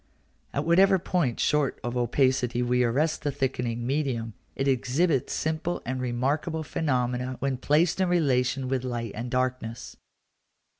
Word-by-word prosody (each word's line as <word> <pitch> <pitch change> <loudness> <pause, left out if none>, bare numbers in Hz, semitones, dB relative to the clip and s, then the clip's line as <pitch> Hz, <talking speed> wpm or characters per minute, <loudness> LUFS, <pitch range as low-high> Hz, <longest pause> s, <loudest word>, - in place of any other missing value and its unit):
At - - -2
whatever 190 +3 +5
point 170 -8 -1
short 150 -3 +1
of 120 +1 -3
opacity 125 0 +1
we 125 +1 +2
arrest 140 +7 +1
the 145 - -1
thickening 125 -4 -2
medium, 130 -5 -1 0.2
it 135 - -1
exhibits 135 +3 +1
simple 160 +2 -1
and 130 0 -3
remarkable 140 +6 -1
phenomena 125 -4 -1
when 135 -2 -1
placed 160 +7 +2
in 185 - +2
relation 135 -6 +1
with 130 -1 -1
light 120 -3 -3
and 120 +3 -5
darkness. 125 -2 -2
130 Hz, 140 wpm, -27 LUFS, 125-150 Hz, 0.2 s, whatever